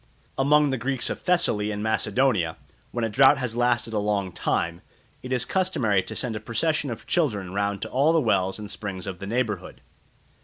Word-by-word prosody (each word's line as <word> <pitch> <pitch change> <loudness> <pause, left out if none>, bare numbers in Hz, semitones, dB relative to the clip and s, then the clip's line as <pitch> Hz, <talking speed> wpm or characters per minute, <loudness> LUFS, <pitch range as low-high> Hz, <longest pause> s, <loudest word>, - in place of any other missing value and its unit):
Among 145 +1 +3
the 135 - -1
Greeks 130 +1 0
of - - -4
Thessaly 110 - +1
and 105 0 -3
Macedonia, 110 -4 +1 0.3
when 120 - -3
a - - 0
drought 135 +6 +6
has 125 -3 -3
lasted 120 -2 +1
a 105 - +1
long 100 -2 -1
time, 85 0 -1 0.4
it 130 - -8
is 125 -1 +2
customary 130 - +1
to - - -6
send 120 -4 -1
a - - -3
procession 145 +7 -1
of 115 - -6
children 105 - 0
round 100 0 -1
to - - -5
all 140 +5 +3
the 165 - +4
wells 95 -9 +1
and 105 -1 -7
springs 95 -3 -5
of 95 -3 -6
the 100 - -6
neighbourhood. 110 -5 -2
110 Hz, 195 wpm, -25 LUFS, 100-135 Hz, 0.4 s, drought